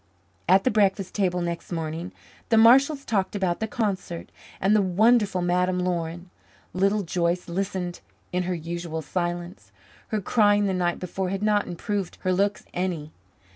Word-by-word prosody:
At 190 +1 +6
the 255 - +2
breakfast 200 -2 +1
table 180 -3 0
next 170 +1 -4
morning 165 +1 -4 0.4
the 225 - +4
Marshalls 270 +6 +5
talked 200 -2 0
about 185 -3 0
the 220 - -1
concert 200 -6 -3 0.3
and 195 +3 +3
the 210 - +5
wonderful 200 0 +3
Madame 180 +1 +1
Laurin. 175 0 -3 0.4
Little 200 +3 +2
Joyce 175 0 -1
listened 180 0 -3 0.3
in 180 - +1
her 180 - 0
usual 165 -1 -5
silence; 175 +2 -4 0.4
her 215 - -1
crying 205 0 +3
the 195 - 0
night 175 -1 0
before 185 +1 -3
had 195 +2 -3
not 210 -1 +2
improved 195 +2 -3
her 185 - +1
looks 200 +2 0
any. 175 -4 -3
185 Hz, 155 wpm, -25 LUFS, 175-205 Hz, 0.4 s, At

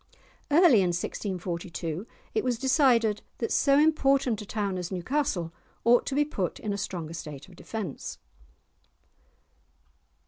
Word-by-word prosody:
Early 295 - +6
in 185 - +2
1642 175 -1 -4 0.3
it - - +1
was 250 -2 0
decided 245 -5 +3 0.2
that 230 - -2
so 275 0 +4
important 275 -6 +3
a 210 - -9
town 200 -4 -2
as 180 0 -5
Newcastle 185 - -1 0.3
ought 235 +1 +4
to 270 - -1
be 295 +1 +3
put 195 - -3
in 210 - -3
a - - -3
stronger 170 -5 -4
state 150 -4 -8
of 180 - -16
defence. 190 - -6
210 Hz, 135 wpm, -28 LUFS, 180-270 Hz, 0.3 s, Early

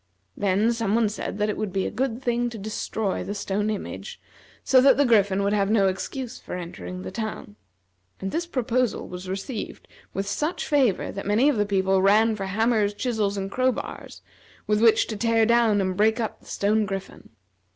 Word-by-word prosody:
Then 205 +4 +2
some 225 -3 0
one 230 -2 +3
said 205 -1 -5
that 210 0 +1
it 210 - -2
would 215 -3 -3
be 190 +1 -1
a - - -2
good 250 +1 -2
thing 240 0 0
to 230 - -8
destroy 215 0 -3
the 205 - -5
stone 205 +1 -1
image 215 - -5 0.4
so 260 -1 +5
that 275 - +6
the 285 - +4
Griffin 200 -4 +3
would 200 +1 +1
have 200 -1 +1
no 210 -3 +4
excuse 240 +6 -4
for - - -7
entering 90 - -7
the 95 - -6
town; 215 - -5 0.6
and 190 0 -4
this 340 +1 -2
proposal 255 -5 -1
was 180 +1 -8
received 200 +5 -5 0.2
with 195 - -3
such 300 - -2
favor 265 -10 +2
that 195 0 -6
many 225 +8 +4
of 290 - +1
the 210 -1 +1
people 190 -1 +2
ran 215 +3 +4
for 195 -2 -4
hammers, 215 0 +1
chisels, 215 -4 -1
and 195 0 -4
crowbars, 255 +2 -2 0.4
with 210 0 +1
which 225 -1 +5
to 220 - -5
tear 225 +1 +2
down 230 -2 +3
and 185 -1 0
break 220 +3 +3
up 225 - -3
the - - -21
stone 210 +1 +1
griffin. 195 0 -7
210 Hz, 195 wpm, -25 LUFS, 195-235 Hz, 0.6 s, that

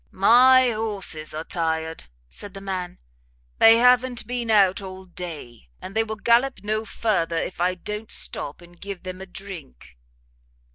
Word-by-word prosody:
"My 250 +5 +5
horses 205 -8 -4
are 155 - -4
tired," 160 -1 -3 0.2
said 200 - -11
the - - -7
man, 185 -2 -5 0.6
"they 225 0 +8
have 250 +1 +6 0.2
been 240 -1 -4
out 200 -3 +4
all 190 -1 -9
day, 160 - -9
and 195 - -9
they 225 - +3
will 220 -1 -5
gallop 235 +1 +2
no 215 +1 -2
further, 170 -8 -1
if 175 +1 -4
I 180 +1 +1
don't 210 +4 -6
stop 145 +4 -2
and 175 0 -18
give 200 -2 -7
them 185 0 -7
a 190 - -8
drink." 70 - -11
190 Hz, 155 wpm, -23 LUFS, 170-220 Hz, 0.6 s, they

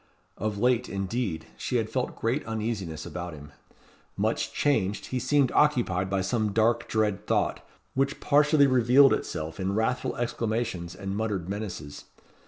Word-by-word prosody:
Of 105 0 -3
late, 125 +2 +2
indeed, 100 -2 -2
she - - -3
had - - 0
felt - - -2
great 120 +6 0
uneasiness 105 -8 -3
about 90 -2 -6
him. 75 0 -12 0.7
Much - - 0
changed, 105 -9 0
he 130 - -1
seemed 135 +1 +2
occupied 115 -11 +2
by 95 0 0
some 105 +1 0
dark, 115 +2 +2
dread 105 -3 0
thought, - - 0 0.3
which 135 +2 0
partially 150 0 +4
revealed 130 +1 +6
itself 80 +3 -4
in 95 +1 -1
wrathful 115 +4 0
exclamations 110 -6 -2
and 95 +1 -4
muttered 105 -5 -2
menaces. 95 -8 -6
110 Hz, 145 wpm, -27 LUFS, 95-125 Hz, 0.7 s, revealed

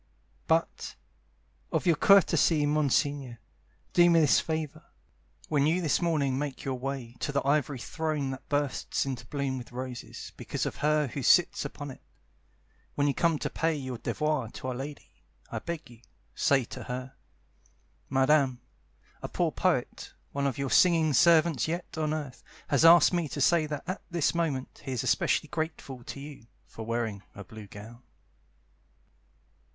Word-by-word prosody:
But, 165 +1 0 0.8
of - - 0
your 170 -2 +4
courtesy, 170 -4 +4
Monsignore, 145 -3 0 0.6
Do 175 0 +6
me 165 -1 +5
this 150 - +5
favour: 160 -2 -4 0.6
When 145 -2 +2
you 165 +3 +2
this 165 -2 +1
morning 145 -6 +1
make 145 -2 -4
your 135 - -1
way 130 -2 -5
To - - -2
the 140 -1 -1
Ivory 145 -1 +1
Throne 150 +1 -2
that 130 0 -9
bursts 145 -3 -1
into 130 -4 -5
bloom 140 -2 -2
with 120 - -11
roses 125 0 -7
because - - -3
of - - -4
her 150 0 +2
who 140 - -5
sits 175 +3 +4
upon 145 0 -6
it, - - -13 0.9
When 145 - +1
you 140 - +2
come 165 0 +2
to - - -3
pay 165 0 0
your 130 -4 -5
devoir 150 -6 -1
to 130 - -5
Our - - -2
Lady, 140 +4 -8 0.3
I - - -3
beg 170 -2 -6
you, 120 -1 -16 0.3
say 135 -2 +2
to - - -8
her: 125 +1 -5 1.0
"Madame, 135 -1 +3 0.6
a - - -4
poor - - 0
poet, - - -1 0.2
one 140 0 0
of 135 - -2
your 140 -1 -2
singing 165 -4 +4
servants 160 +1 +4
yet 170 +2 -4
on 155 -1 -1
earth, 150 -5 -5 0.3
Has 140 +2 +3
asked 170 +1 +8
me 170 -3 0
to 145 - -6
say 155 +2 +3
that 150 -2 -5
at 185 +2 -4
this 170 -4 +1
moment 155 -6 -2
he 135 -2 -4
is 125 - -2
especially - - +1
grateful 155 -6 -5
to - - -7
you 140 -5 -10 0.2
For 115 - -9
wearing 115 -4 -2
a 100 - -8
blue 110 +2 -11
gown." 110 +4 -11
145 Hz, 165 wpm, -29 LUFS, 130-160 Hz, 1.0 s, asked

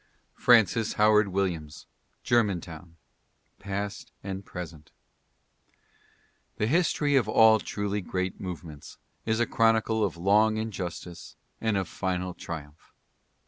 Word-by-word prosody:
FRANCIS 115 -2 +4
HOWARD 105 0 +4
WILLIAMS: 90 -6 -3 0.4
Germantown. 90 -7 -1 0.6
PAST 100 +1 -5
AND 95 0 -5
PRESENT. 85 -5 -9 1.7
The 105 - +1
history 150 +1 +2
of 120 -6 +2
all 110 0 +6
truly 105 0 -3
great 95 +1 -3
movements 85 -5 -8 0.3
is 110 0 +1
a 120 - +3
chronicle 110 -1 +2
of 95 -5 -1
long 105 +5 +3
injustice 90 -5 -6 0.3
and 110 -3 +1
of 95 -3 -1
final 90 0 -3
triumph. 75 -3 -9
100 Hz, 105 wpm, -27 LUFS, 90-110 Hz, 1.7 s, all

